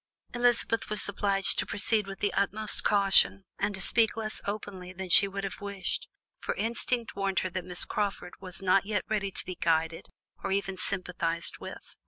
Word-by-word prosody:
Elizabeth 240 -1 +2
was 210 0 0
obliged 200 -1 +1
to - - 0
proceed 210 0 +1
with 195 0 -8
the 205 - +1
utmost 210 +1 +1
caution, 195 - +4
and 205 - 0
to 190 - -7
speak 225 +2 +2
less 215 -1 -3
openly 200 -3 -5
than 185 0 -6
she 200 - +8
would 195 0 -5
have 195 0 -5
wished, 200 -2 -2 0.3
for - - -3
instinct 235 +2 -1
warned 195 -1 -1
her 185 - -3
that 185 0 -3
Miss 180 -1 +1
Crawford 200 -3 -2
was 190 0 -2
not 190 +1 +4
yet 210 -2 0
ready 205 -2 0
to - - -8
be 185 - -4
guided, 165 -1 0 0.3
or - - -2
even 195 -1 0
sympathized 175 -3 -1
with. - - -8
195 Hz, 185 wpm, -29 LUFS, 185-210 Hz, 0.3 s, she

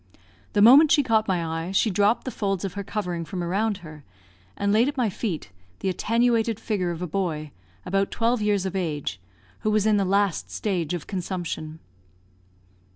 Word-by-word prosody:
The 205 -2 +4
moment 280 +7 +8
she 295 -2 +5
caught 220 -3 +2
my 180 -4 0
eye 165 +2 -3
she 205 +3 +2
dropped 205 +4 +2
the 260 - -3
folds 195 -4 -2
of 190 - -4
her 200 - -4
covering 180 -5 -3
from 175 +3 -5
around 200 +4 0
her, 155 -1 -11 0.5
and 200 0 +1
laid 230 +4 +4
at 285 - -3
my 235 -5 +1
feet 180 - -4 0.3
the 190 - 0
attenuated 230 +3 +1
figure 200 -6 -1
of 170 0 -4
a - - -2
boy, 155 -4 -2 0.3
about 195 +1 0
twelve 230 0 0
years 205 -2 +1
of 190 - -3
age, 150 - -3 0.4
who 215 - -1
was 215 -1 +2
in 215 -1 +4
the 200 - +2
last 195 -1 +1
stage 180 -5 -2
of 170 - -6
consumption. 175 -4 -4
195 Hz, 185 wpm, -25 LUFS, 175-215 Hz, 0.5 s, moment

